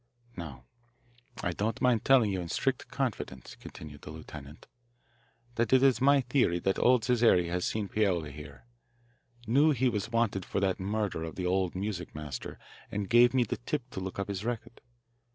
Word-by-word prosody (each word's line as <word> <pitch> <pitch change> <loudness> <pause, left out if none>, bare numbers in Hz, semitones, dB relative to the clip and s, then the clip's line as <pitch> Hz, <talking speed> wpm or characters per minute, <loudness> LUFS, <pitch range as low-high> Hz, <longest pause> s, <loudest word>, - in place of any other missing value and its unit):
"Now 65 -8 -8 0.8
I 90 - 0
don't 105 +5 -2
mind 125 -4 +2
telling 125 -6 +5
you 95 -2 -2
in 85 - -6
strict - - -1
confidence," 65 -2 -4
continued 75 -2 -11
the - - -10
lieutenant, 75 -1 -10 0.9
"that 115 -1 +1
it's 130 -1 +5
my 140 +1 +5
theory 125 -8 +2
that 95 +2 0
old 125 -2 +4
Cesare 115 -8 +4
has 90 +1 -1
seen 110 -2 -2
Paoli 90 -8 0
here, 70 +5 -11 0.8
knew 140 +8 +4
he 130 -3 +2
was 105 -2 -2
wanted 115 -5 +1
for - - -2
that 95 -2 0
murder 100 -3 -2
of 80 - -6
the 90 - -3
old 95 0 0
music 95 -3 -4
master, 75 -4 -6 0.3
and 100 -1 -3
gave 120 +2 +6
me 125 - +4
the - - -3
tip 130 +1 -3
to - - -5
look 95 0 -5
up 100 - -2
his 100 -1 -4
record. 120 0 -5
100 Hz, 175 wpm, -30 LUFS, 85-120 Hz, 0.9 s, gave